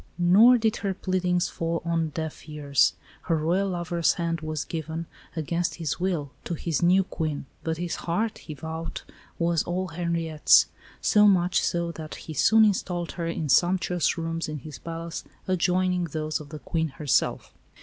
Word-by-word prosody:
Nor 200 Hz, +8 st, +7 dB
did 220 Hz, -1 st, +1 dB
her 195 Hz, -2 st, -2 dB
pleadings 180 Hz, -2 st, 0 dB
fall 165 Hz, 0 st, -2 dB
on 165 Hz, -1 st, 0 dB
deaf 160 Hz, 0 st, -6 dB
ears. 145 Hz, -2 st, +2 dB, 0.4 s
Her 165 Hz, -, +3 dB
Royal 175 Hz, +6 st, +1 dB
lover's 175 Hz, -2 st, +1 dB
hand 165 Hz, -2 st, -2 dB
was 155 Hz, -1 st, -3 dB
given, 160 Hz, 0 st, -4 dB, 0.3 s
against 170 Hz, +2 st, -1 dB
his 160 Hz, -2 st, -3 dB
will, 170 Hz, -7 st, -1 dB
to 170 Hz, -, -2 dB
his 165 Hz, -1 st, -2 dB
new 185 Hz, +3 st, +5 dB
Queen, 155 Hz, -6 st, -3 dB, 0.2 s
but 160 Hz, 0 st, -1 dB
his 175 Hz, 0 st, -3 dB
heart, 215 Hz, +6 st, -2 dB
he 155 Hz, -, -8 dB
vowed, 160 Hz, +3 st, -6 dB, 0.3 s
was 170 Hz, -1 st, +2 dB
all 185 Hz, +1 st, -2 dB
Henriette's 165 Hz, -2 st, +3 dB, 0.4 s
so 210 Hz, 0 st, +5 dB
much 180 Hz, -2 st, +3 dB
so 170 Hz, -1 st, 0 dB
that 155 Hz, -2 st, -8 dB
he 160 Hz, -, -8 dB
soon 220 Hz, +9 st, +5 dB
installed 180 Hz, -4 st, -1 dB
her 170 Hz, -2 st, -4 dB
in 165 Hz, -2 st, -2 dB
sumptuous 180 Hz, +4 st, +2 dB
rooms 165 Hz, -1 st, -3 dB
in 155 Hz, -, -4 dB
his 150 Hz, +1 st, -9 dB
palace 165 Hz, 0 st, -6 dB, 0.2 s
adjoining 180 Hz, 0 st, +1 dB
those 155 Hz, 0 st, -2 dB
of 150 Hz, -2 st, -10 dB
the 155 Hz, -, -7 dB
Queen 160 Hz, +1 st, -1 dB
herself. 145 Hz, -3 st, 0 dB
170 Hz, 165 wpm, -26 LUFS, 160-180 Hz, 0.4 s, Nor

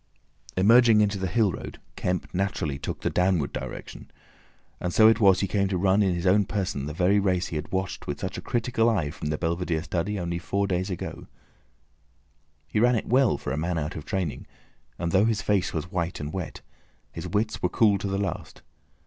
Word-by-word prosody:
Emerging 115 Hz, +3 st, +6 dB
into 100 Hz, -1 st, +2 dB
the 95 Hz, -, -1 dB
hill 105 Hz, 0 st, +2 dB
road, -, -, -8 dB, 0.2 s
Kemp 90 Hz, 0 st, -2 dB
naturally 90 Hz, -7 st, -1 dB
took -, -, -5 dB
the -, -, 0 dB
downward 90 Hz, -5 st, +1 dB
direction, -, -, -7 dB, 0.7 s
and 90 Hz, -, -2 dB
so 110 Hz, +4 st, +6 dB
it 110 Hz, 0 st, +5 dB
was 95 Hz, -4 st, +5 dB
he 100 Hz, -, 0 dB
came 100 Hz, +1 st, +1 dB
to 95 Hz, -1 st, -1 dB
run 95 Hz, +3 st, +3 dB
in 95 Hz, -3 st, +2 dB
his 85 Hz, +1 st, -3 dB
own 100 Hz, +3 st, +5 dB
person 90 Hz, -8 st, -3 dB
the -, -, -4 dB
very 95 Hz, +5 st, +3 dB
race 95 Hz, -2 st, 0 dB
he -, -, -5 dB
had 75 Hz, -, -4 dB
watched 95 Hz, 0 st, -3 dB
with 70 Hz, -, -3 dB
such 95 Hz, 0 st, -4 dB
a -, -, -5 dB
critical 120 Hz, -1 st, +1 dB
eye 90 Hz, -10 st, 0 dB
from 75 Hz, -, -6 dB
the 75 Hz, 0 st, -1 dB
belvedere 85 Hz, -1 st, -1 dB
study 95 Hz, +5 st, -2 dB
only 85 Hz, -1 st, -2 dB
four 100 Hz, +3 st, -1 dB
days 95 Hz, 0 st, -1 dB
ago. 90 Hz, -, -6 dB, 1.4 s
He 80 Hz, -, -1 dB
ran 120 Hz, +2 st, +4 dB
it 110 Hz, -, -1 dB
well, 125 Hz, -, +3 dB
for -, -, -5 dB
a 70 Hz, -, -2 dB
man 85 Hz, +2 st, -1 dB
out 80 Hz, +4 st, -3 dB
of 75 Hz, -, -6 dB
training, 95 Hz, -7 st, -3 dB, 0.5 s
and 85 Hz, 0 st, -2 dB
though 95 Hz, +3 st, +4 dB
his 110 Hz, -3 st, 0 dB
face 100 Hz, -3 st, +1 dB
was 85 Hz, +2 st, -4 dB
white 85 Hz, -2 st, -2 dB
and 75 Hz, +1 st, -5 dB
wet, 95 Hz, -3 st, -5 dB, 0.5 s
his -, -, -6 dB
wits 105 Hz, +1 st, -1 dB
were 90 Hz, -, +1 dB
cool 105 Hz, -2 st, +3 dB
to 100 Hz, -, -3 dB
the 95 Hz, 0 st, -1 dB
last. 100 Hz, -3 st, -4 dB
95 Hz, 210 wpm, -26 LUFS, 85-105 Hz, 1.4 s, Emerging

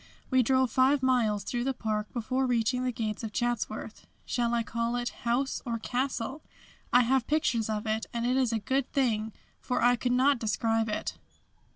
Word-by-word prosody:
We 260 Hz, 0 st, +5 dB
drove 260 Hz, 0 st, +2 dB
five 265 Hz, +2 st, +3 dB
miles 225 Hz, -6 st, +2 dB
through 240 Hz, +2 st, -2 dB
the 265 Hz, +1 st, -1 dB
park 215 Hz, -2 st, -2 dB
before 255 Hz, +3 st, -1 dB
reaching 245 Hz, +1 st, +1 dB
the 255 Hz, -, 0 dB
gates 220 Hz, -1 st, -3 dB
of 220 Hz, -, -4 dB
Chatsworth 240 Hz, 0 st, -3 dB, 0.2 s
shall 235 Hz, -1 st, 0 dB
I 235 Hz, -, +1 dB
call 235 Hz, +1 st, -2 dB
it 245 Hz, 0 st, -1 dB, 0.2 s
house 265 Hz, +3 st, 0 dB
or 235 Hz, -3 st, -2 dB
castle? 255 Hz, +3 st, -2 dB, 0.5 s
I 245 Hz, -, +6 dB
have 255 Hz, 0 st, +2 dB
pictures 300 Hz, -8 st, +1 dB
of 215 Hz, 0 st, -2 dB
it, 220 Hz, 0 st, -1 dB
and 235 Hz, 0 st, -2 dB
it 250 Hz, +1 st, +2 dB
is 260 Hz, -3 st, +2 dB
a 225 Hz, -, +1 dB
good 265 Hz, +5 st, -1 dB
thing 225 Hz, -5 st, +1 dB, 0.3 s
for 250 Hz, -, -1 dB
I 245 Hz, 0 st, +5 dB
could 245 Hz, +1 st, -1 dB
not 265 Hz, +1 st, +3 dB
describe 225 Hz, +1 st, 0 dB
it. 210 Hz, -, -3 dB
240 Hz, 190 wpm, -29 LUFS, 225-260 Hz, 0.5 s, I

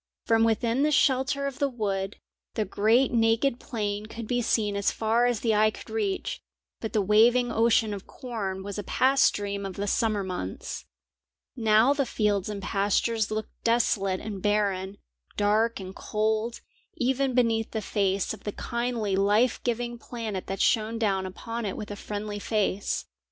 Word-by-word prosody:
From 225 Hz, 0 st, +4 dB
within 230 Hz, +3 st, +1 dB
the 300 Hz, -, +3 dB
shelter 280 Hz, -1 st, +2 dB
of 275 Hz, -2 st, -4 dB
the 280 Hz, -, +2 dB
wood, 200 Hz, -5 st, -2 dB, 0.4 s
the 215 Hz, -, 0 dB
great 220 Hz, +7 st, +3 dB
naked 230 Hz, +2 st, +2 dB
plain 210 Hz, -3 st, -3 dB
could 230 Hz, +1 st, -7 dB
be 245 Hz, +1 st, +1 dB
seen 215 Hz, -3 st, +1 dB
as 200 Hz, 0 st, +2 dB
far 230 Hz, +2 st, +2 dB
as 240 Hz, -3 st, 0 dB
the 225 Hz, -2 st, +2 dB
eye 215 Hz, +1 st, +4 dB
could 215 Hz, -, -10 dB
reach, 405 Hz, -4 st, -2 dB, 0.4 s
but 220 Hz, -, -4 dB
the 215 Hz, -3 st, +2 dB
waving 235 Hz, +4 st, +4 dB
ocean 225 Hz, -2 st, +3 dB
of 195 Hz, -1 st, -7 dB
corn 200 Hz, -7 st, -5 dB
was 200 Hz, +1 st, -5 dB
a -, -, -4 dB
past 270 Hz, +6 st, +4 dB
dream 200 Hz, -1 st, -3 dB
of 195 Hz, -2 st, -5 dB
the 200 Hz, -, -2 dB
summer 215 Hz, -1 st, +1 dB
months. 185 Hz, -1 st, -5 dB, 0.7 s
Now 225 Hz, +2 st, +4 dB
the 280 Hz, -2 st, 0 dB
fields 205 Hz, -2 st, 0 dB
and 200 Hz, -2 st, -5 dB
pastures 205 Hz, +3 st, +1 dB
looked 215 Hz, 0 st, -4 dB
desolate 200 Hz, -5 st, +1 dB
and 205 Hz, -3 st, -6 dB
barren, 200 Hz, -2 st, 0 dB, 0.4 s
dark 215 Hz, +3 st, +2 dB
and 190 Hz, 0 st, -8 dB
cold, 220 Hz, +2 st, -1 dB, 0.3 s
even 265 Hz, +1 st, 0 dB
beneath 225 Hz, -3 st, +2 dB
the 220 Hz, -, -3 dB
face 195 Hz, -2 st, 0 dB
of 215 Hz, -, -11 dB
the 205 Hz, -, -4 dB
kindly 235 Hz, -4 st, -2 dB
life 210 Hz, +5 st, +3 dB
giving 240 Hz, 0 st, -2 dB
planet 225 Hz, -6 st, -5 dB
that 195 Hz, 0 st, -3 dB
shone 225 Hz, 0 st, +2 dB
down 195 Hz, -4 st, 0 dB
upon 230 Hz, +5 st, -5 dB
it 200 Hz, -3 st, -3 dB
with 210 Hz, -, -6 dB
a -, -, -4 dB
friendly 205 Hz, 0 st, -5 dB
face. 205 Hz, -2 st, -1 dB
220 Hz, 170 wpm, -27 LUFS, 205-235 Hz, 0.7 s, From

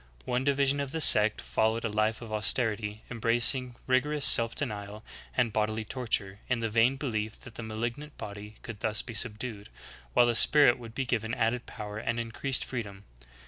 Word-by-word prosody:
One 125 Hz, +1 st, -1 dB
di 140 Hz, -, +2 dB
vision 140 Hz, 0 st, +1 dB
of 140 Hz, -1 st, -3 dB
the 160 Hz, -, -2 dB
sect 105 Hz, -7 st, +7 dB
followed 110 Hz, +1 st, -1 dB
a -, -, -1 dB
life 110 Hz, +2 st, -1 dB
of 110 Hz, -2 st, -9 dB
austerity, 110 Hz, -1 st, -1 dB
embracing 120 Hz, +2 st, +2 dB
rigorous 140 Hz, +3 st, +1 dB
self 115 Hz, 0 st, +6 dB
denial, 105 Hz, -5 st, -6 dB, 0.3 s
and 120 Hz, -4 st, +1 dB
bodily 110 Hz, 0 st, -1 dB
torture, 105 Hz, -6 st, -2 dB
in 130 Hz, -, +1 dB
the 115 Hz, -1 st, -3 dB
vain 115 Hz, +4 st, +3 dB
belief 110 Hz, -6 st, -4 dB
that -, -, -11 dB
the 115 Hz, -, -8 dB
malignant 120 Hz, +7 st, -6 dB
body 105 Hz, +1 st, -9 dB
could 115 Hz, -5 st, -8 dB
thus 110 Hz, 0 st, -1 dB
be 115 Hz, -, -9 dB
subdued, 110 Hz, -1 st, -3 dB, 0.4 s
while 120 Hz, -, +5 dB
the 120 Hz, -, +1 dB
spirit 140 Hz, +1 st, +5 dB
would 115 Hz, -2 st, -11 dB
be 135 Hz, -, -2 dB
given 115 Hz, -1 st, -2 dB
added 120 Hz, +1 st, -1 dB
power 105 Hz, -1 st, -7 dB
and 115 Hz, +1 st, -3 dB
increased 115 Hz, +3 st, -2 dB
freedom. 100 Hz, -6 st, -7 dB
115 Hz, 185 wpm, -28 LUFS, 110-125 Hz, 0.4 s, sect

